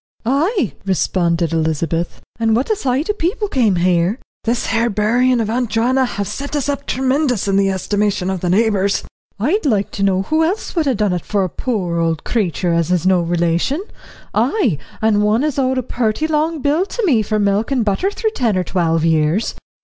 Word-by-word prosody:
"Ay," 285 - +1
responded 170 -2 0
Elizabeth, 165 +1 -1 0.2
"and 225 -1 +2
what 255 - 0
a - - +3
sight 270 -2 -1
o' - - -3
people 415 +3 -1
came 235 - +2
here." 175 +3 +2 0.3
"This 235 +1 0
here 230 +1 +1
buryin' 235 +4 +2
of 225 - 0
Aunt 240 +1 -1
Joanna 245 +4 +2
have 200 -5 -3
set 280 +7 -5
us 285 -2 -1
up 280 0 -3
tremendous 260 -4 0
in 195 - +1
the 195 0 +3
estimation 200 0 0
of 190 - -3
the 175 - -2
neighbours." 200 0 +2 0.4
"I'd 315 - +1
like 215 -9 +1
to 200 - -5
know 195 -1 +2
who 315 +9 +1
else 380 +6 -2
would 320 -4 +1
ha' 265 - +2
done 205 -3 +1
it 175 - -3
for 205 -2 0
a 185 - -1
poor 180 -7 -2
old 165 -2 0
creetur 180 -5 0
as 170 0 +1
is 180 -1 +1
no 185 -2 +4
relation; 175 - 0 0.5
ay 240 - +1 0.2
and 215 -2 +3
one 215 +5 +2
as 300 -2 -1
owed 260 0 +1
a 255 - 0
purty 235 +4 -1
long 315 0 0
bill 300 +5 +2
to 470 0 -2
me 255 - +3
for 215 +1 -1
milk 205 +1 +1
and 255 -5 0
butter 210 - +1
through 440 +2 -2
ten 235 - 0
or 185 - +1
twelve 165 -2 0
years." 160 +5 +1
215 Hz, 205 wpm, -18 LUFS, 185-265 Hz, 0.5 s, no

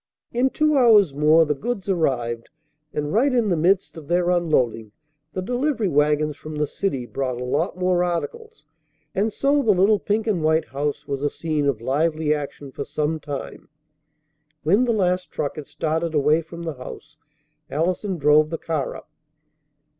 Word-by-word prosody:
In 250 +3 +2
two 305 +2 +2
hours 210 - +6
more 155 +3 +5
the 150 - +1
goods 205 - -4
arrived, 120 -10 -1 0.4
and 150 +1 -3
right 260 +7 +3
in 240 -4 +2
the 175 - +2
midst 180 +2 +1
of 155 -3 -10
their 175 +1 +2
unloading 125 -11 0 0.4
the 185 - -3
delivery 245 0 0
wagons 150 0 +2
from 155 +1 -8
the 150 0 +1
city 140 -6 -3
brought 125 -1 -3
a - - -4
lot 155 +8 -1
more 180 -1 +2
articles; 165 -3 -4 0.5
and 210 +3 0
so 280 +5 +2
the 220 -5 +4
little 200 +3 +4
pink 215 +1 -1
and 195 -8 0
white 160 -3 +2
house 140 +3 -3
was 140 -1 -3
a 145 - +1
scene 155 -3 -2
of 125 -6 0
lively 155 +4 +1
action 145 -1 -6
for 140 - -5
some 150 +2 -2
time. 145 -2 -7 0.9
When 200 +11 +3
the 240 - +1
last 180 -4 0
truck 145 - -3
had 150 -3 -8
started 160 +2 -2
away 150 +2 +3
from 170 +1 -9
the 165 -2 -3
house, 130 +3 -10 0.5
Allison 180 +5 -1
drove 150 +1 +4
the 165 - -3
car 155 -5 -3
up. 155 - -12
160 Hz, 175 wpm, -23 LUFS, 145-190 Hz, 0.9 s, hours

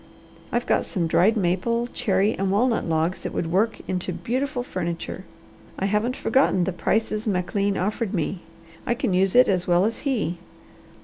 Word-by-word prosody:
I've - - 0
got - - +2
some 175 -3 -2
dried 195 +7 +3
maple, 210 +6 0
cherry, 200 +2 +1
and 195 0 -1
walnut 225 +4 +2
logs 160 +3 0
that - - -5
would 165 -1 -2
work 215 +5 +1
into 180 -1 -2
beautiful 255 +1 -2
furniture. 175 -2 -4 0.5
I 190 - -1
haven't 210 +5 0
forgotten 260 -12 +2
the 190 - -1
prices 215 +4 -1
McLean 200 +1 0
offered 210 +2 -1
me. 180 -1 -2 0.5
I 235 - +2
can 240 -6 -1
use 190 +2 +2
it 250 +1 +7
as 180 -2 0
well 175 +2 +4
as 225 - -2
he. 215 - -1
195 Hz, 170 wpm, -24 LUFS, 180-230 Hz, 0.5 s, it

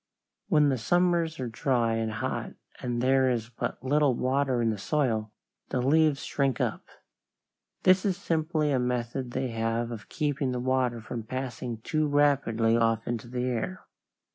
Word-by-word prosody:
When 150 -6 +4
the 130 -3 0
summers 170 +3 +1
are 130 - -2
dry 115 -1 +1
and 115 0 -1
hot 105 - -3 0.3
and 120 -1 -2
there 130 0 +4
is 115 -2 -1
but 125 - -5
little 140 -1 +3
water 130 0 +1
in 115 -1 +2
the 105 - -4
soil, 110 -5 0 0.4
the 130 - -1
leaves 150 +2 +3
shrink 135 -4 0
up. - - -2 1.0
This 185 0 +5
is 190 -3 0
simply 155 -2 0
a 130 - +2
method 125 +1 -2
they 130 +1 -2
have 115 +1 -1
of 110 -3 -8
keeping 145 -4 -1
the 125 - -2
water 125 -2 0
from 115 +1 -5
passing 120 -1 -5
too 155 +5 0
rapidly 140 -6 +3
off 115 -1 +1
into 120 -1 -3
the 125 +1 -3
air. 130 +10 -3
130 Hz, 165 wpm, -28 LUFS, 115-145 Hz, 1.0 s, This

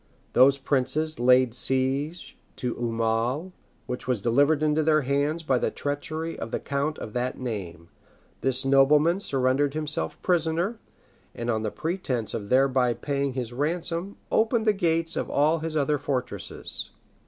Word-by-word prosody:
Those 135 +2 +6
princes 140 +3 0
laid 125 0 +4
siege 135 +6 -1 0.2
to 125 -2 -2
Aumale, 115 +7 -1 0.3
which 125 - -5
was 125 -4 +1
delivered 140 +8 +3
into 155 0 +2
their 155 0 +3
hands 145 +4 0
by 130 -5 +2
the - - +1
treachery 155 +3 -4
of - - -5
the - - -2
count 140 +2 -2
of 105 - -7
that 125 +1 -2
name: 95 -9 -6 0.5
this 135 0 0
nobleman 150 +6 +4
surrendered 135 -3 +1
himself 155 -1 -3
prisoner; 175 +5 +1 0.6
and 120 0 -2
on 110 -1 -1
pretence 140 - -3
of 100 -2 -4
thereby 130 -2 +3
paying 140 +2 -2
his 125 -2 -4
ransom, 170 +6 -2
opened 225 0 +2
the 215 - +4
gates 165 -3 0
of - - -2
all 155 +3 +2
his 160 0 -3
other 150 0 +1
fortresses. 130 -3 -3
140 Hz, 145 wpm, -26 LUFS, 125-160 Hz, 0.6 s, Those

